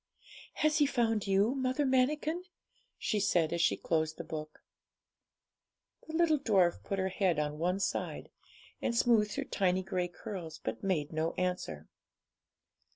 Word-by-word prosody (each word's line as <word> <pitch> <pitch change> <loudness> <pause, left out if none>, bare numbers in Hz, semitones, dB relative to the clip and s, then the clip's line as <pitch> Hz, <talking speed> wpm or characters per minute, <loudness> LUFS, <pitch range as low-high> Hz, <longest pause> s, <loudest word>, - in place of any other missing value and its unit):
'Has 310 +1 +2
he 290 - +5
found 225 -6 +1
you, 200 +5 +3
Mother 260 +1 0
Manikin?' 300 +6 +1 0.5
she 210 - 0
said, 170 -5 +2
as 170 - 0
she 175 - +3
closed 160 -1 -1
the - - -5
book. 155 -1 -7 1.4
The 315 - -5
little 320 -3 +3
dwarf 190 -9 +2
put 195 - -3
her 190 0 0
head 185 -3 +1
on 150 0 -2
one 180 +3 0
side, 195 - -2 0.5
and 235 - 0
smoothed 220 -3 +3
her - - -1
tiny 185 -1 +1
grey 180 -1 -1
curls, 175 -3 -7
but - - -5
made 165 -7 -1
no 160 +1 0
answer. 180 0 -2
195 Hz, 150 wpm, -32 LUFS, 170-255 Hz, 1.4 s, he